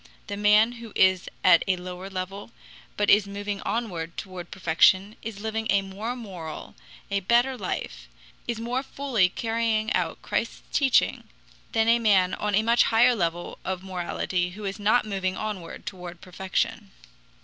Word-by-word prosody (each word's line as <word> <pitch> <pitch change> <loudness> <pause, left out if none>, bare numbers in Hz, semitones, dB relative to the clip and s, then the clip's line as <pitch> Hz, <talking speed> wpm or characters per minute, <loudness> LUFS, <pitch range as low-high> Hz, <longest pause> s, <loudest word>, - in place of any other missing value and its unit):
The 205 - -5
man 210 +2 +5
who 230 -2 -10
is 185 -1 +3
at 170 - +7
a 190 - +3
lower 180 +1 -7
level 195 +2 -5 0.5
but 205 -1 +3
is 205 -1 +5
moving 205 0 -4
onward 175 -8 -3
toward 180 -2 -7
perfection 190 +4 +3
is 220 -2 -6
living 220 0 -2
a 200 -1 +3
more 205 +5 -5
moral, 185 -10 -8 0.4
a 200 - +2
better 240 +7 +2
life, - - -5 0.4
is 235 -2 -2
more 240 +3 -1
fully 265 -8 +1
carrying 225 +1 0
out - - -1
Christ's - - -2
teaching, 275 -4 +3 0.5
than 225 -1 +3
the 230 +1 +4
man 195 -5 +3
on 210 -1 -1
a 215 - +3
much 235 +1 +4
higher 240 +3 +5
level 175 -5 -2
of 185 -1 -3
morality 180 -1 -2
who 210 - -7
is 195 +1 -4
not 215 +4 +3
moving 190 -3 -2
onward 205 -6 -5
toward 180 -2 -7
perfection. 185 - -3
200 Hz, 160 wpm, -26 LUFS, 185-225 Hz, 0.5 s, at